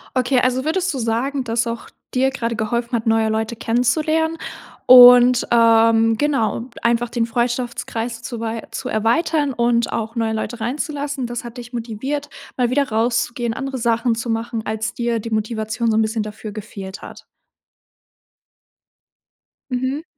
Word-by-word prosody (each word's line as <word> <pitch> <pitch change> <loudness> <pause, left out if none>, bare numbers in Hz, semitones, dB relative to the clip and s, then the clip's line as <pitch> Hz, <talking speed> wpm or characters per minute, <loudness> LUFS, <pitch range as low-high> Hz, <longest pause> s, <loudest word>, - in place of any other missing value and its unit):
Okay, 255 0 +2
also 255 +1 +1
würdest 360 +2 0
du 265 - -4
sagen, 250 +4 -1
dass 230 0 0
auch 230 0 -5 0.2
dir 265 +1 +2
gerade 235 -3 -3
geholfen 235 +3 -2
hat, 225 0 -2
neue 225 0 +3
Leute 220 +1 -2
kennenzulernen 310 +8 0 0.5
und, 245 0 +8
ähm, 225 -1 +4
genau, 255 -4 0
einfach 235 0 +1
den 235 -1 0
Freundschaftskreis 235 -1 -3
zu 240 -1 -6
wei 225 0 -3
zu - - -5
erweitern 275 +6 +1
und 235 -1 +1
auch 225 +1 -3
neue 225 -1 0
Leute 225 +2 -4
reinzulassen, 280 +2 -3
das 240 0 -5
hat 240 +1 -9
dich 245 +1 -9
motiviert, 255 +6 -4 0.3
mal 245 -1 +2
wieder 280 +1 +1
rauszugehen, 235 +1 0
andere 270 0 -4
Sachen 235 0 +1
zu 230 +1 -4
machen, 225 0 -2
als 220 0 -2
dir 235 -1 -1
die 230 +1 -7
Motivation 220 +1 -1
so 220 - +2
'n - - +4
bisschen 220 +1 -1
dafür 210 0 -7
gefehlt 200 -2 -8
hat? - - -11 2.5
Mhm. 260 +5 -2
235 Hz, 150 wpm, -20 LUFS, 225-255 Hz, 2.5 s, und